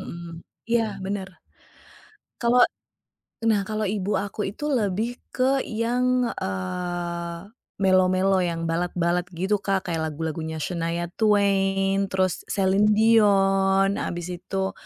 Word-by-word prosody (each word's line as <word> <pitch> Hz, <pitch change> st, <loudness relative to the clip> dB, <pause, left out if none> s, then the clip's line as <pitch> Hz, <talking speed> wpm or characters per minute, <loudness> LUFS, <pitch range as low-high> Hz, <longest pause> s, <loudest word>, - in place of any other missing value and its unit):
Mhm. 170 Hz, -1 st, -8 dB, 0.3 s
Iya, 235 Hz, -1 st, +3 dB, 0.2 s
benar. 195 Hz, -1 st, -3 dB, 1.1 s
Kalau 245 Hz, +1 st, +4 dB, 0.8 s
nah, 215 Hz, -3 st, +3 dB
kalau 215 Hz, 0 st, -1 dB
ibu 200 Hz, 0 st, -1 dB
aku 200 Hz, 0 st, -3 dB
itu 255 Hz, +9 st, -7 dB
lebih 230 Hz, -3 st, -1 dB
ke 265 Hz, +1 st, +1 dB
yang, 250 Hz, +3 st, 0 dB
eee, 170 Hz, -, -4 dB, 0.2 s
mellow-mellow, 185 Hz, 0 st, +3 dB
yang 165 Hz, -1 st, -2 dB
ballad-ballad, 175 Hz, +1 st, 0 dB
gitu, 190 Hz, +4 st, 0 dB
Kak, 190 Hz, -2 st, -1 dB
kayak 165 Hz, -, -1 dB
lagu-lagunya 160 Hz, +1 st, -4 dB
Shania 170 Hz, +1 st, -2 dB
Twain, 195 Hz, -2 st, +2 dB
terus 185 Hz, -2 st, 0 dB
Celine 195 Hz, +1 st, +2 dB
Dion, 195 Hz, -3 st, +4 dB
abis 175 Hz, 0 st, -4 dB
itu, 190 Hz, +1 st, -2 dB
195 Hz, 110 wpm, -24 LUFS, 175-210 Hz, 1.1 s, Kalau